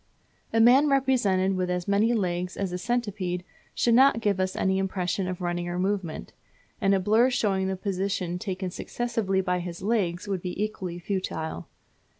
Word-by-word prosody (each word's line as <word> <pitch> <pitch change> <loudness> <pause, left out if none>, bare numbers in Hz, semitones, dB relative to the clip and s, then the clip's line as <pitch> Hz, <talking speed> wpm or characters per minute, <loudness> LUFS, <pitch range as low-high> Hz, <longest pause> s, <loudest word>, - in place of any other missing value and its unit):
A 225 - +2
man 255 +6 +6
represented 235 -9 +2
with 185 -1 -1
as 180 -1 -2
many 205 +3 +3
legs 180 -5 -1
as 195 -2 -2
a 180 - -3
centipede 195 -5 -2 0.4
would 235 - +4
not 260 0 +6
give 205 -4 0
us 185 0 0
any 190 0 +1
impression 185 -1 -1
of 185 0 -4
running 175 0 -2
or 175 - -3
movement; 185 - -2 0.5
and 195 0 +4
a - - +2
blur 220 +6 +4
showing 195 -6 +1
the 190 - -1
positions 185 -2 -2
taken 190 -3 -3
successively 225 -3 -1
by 180 -1 0
his 175 0 -6
legs 195 -4 0
would 195 -3 -2
be 180 +1 -5
equally 190 -5 -3
futile. 175 -3 -4
190 Hz, 170 wpm, -26 LUFS, 180-215 Hz, 0.5 s, man